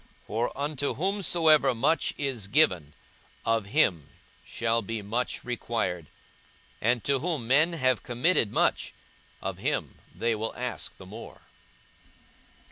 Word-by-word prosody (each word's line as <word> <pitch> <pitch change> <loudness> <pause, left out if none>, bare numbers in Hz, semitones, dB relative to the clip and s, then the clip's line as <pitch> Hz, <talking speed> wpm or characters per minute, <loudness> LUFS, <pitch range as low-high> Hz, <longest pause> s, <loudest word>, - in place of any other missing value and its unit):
For 115 +3 -1
unto 145 0 -1
whomsoever 165 -7 +3
much 145 +8 +1
is 130 -8 -2
given, 95 - +2 0.5
of 115 -3 +1
him 80 -7 +2 0.3
shall 115 0 0
be 110 0 -4
much 115 +5 -2
required: 110 -9 -2 0.7
and 120 +1 +2
to 140 -1 +2
whom 155 -5 -1
men 150 +8 +4
have 130 -6 +2
committed 120 - +1
much, - - +1 0.5
of - - -4
him - - -2 0.2
they 115 0 +1
will 110 +1 -3
ask 125 -1 -5
the 95 - -12
more. 105 +5 -10
120 Hz, 125 wpm, -28 LUFS, 110-145 Hz, 0.7 s, men